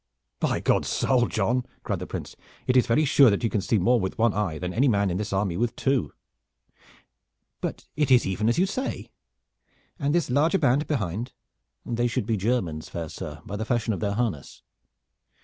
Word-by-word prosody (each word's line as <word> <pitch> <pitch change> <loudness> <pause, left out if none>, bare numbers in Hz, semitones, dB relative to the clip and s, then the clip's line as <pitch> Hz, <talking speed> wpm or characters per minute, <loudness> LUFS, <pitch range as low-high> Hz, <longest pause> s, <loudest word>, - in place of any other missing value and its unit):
"By - - 0
God's - - +2
soul, 125 -3 +2
John!" 120 +4 0 0.2
cried - - -2
the - - -6
Prince, - - -6 0.3
"it 125 - +1
is 125 - +4
very 150 +7 +3
sure 140 -2 +6
that 100 +1 0
you 115 - +1
can 105 - 0
see 110 +3 +1
more 120 +6 +3
with 95 -2 -3
one 115 -2 +3
eye 95 -6 -1
than 90 +2 -4
any 135 +6 +3
man 100 -5 +2
in 90 - -1
this 105 +1 -3
army 95 -3 0
with 120 +2 -1
two. 135 - 0 1.5
But - - -5
it 150 -1 +1
is 125 -2 +5
even 105 +4 0
as 120 - +1
you 180 - +4
say. 255 +7 -4 0.9
And 145 +1 +1
this 170 -7 +1
larger 155 +8 +3
band 140 -1 +2
behind?" 110 - -2 0.5
"They 120 0 0
should 120 -2 -2
be 115 0 0
Germans, 95 -7 -1
fair 85 -2 -5
sir, 75 +1 -8
by 100 - -5
the 110 - -2
fashion 115 0 0
of 95 - -4
their 100 +4 -1
harness." 100 - -3
115 Hz, 200 wpm, -26 LUFS, 95-125 Hz, 1.5 s, sure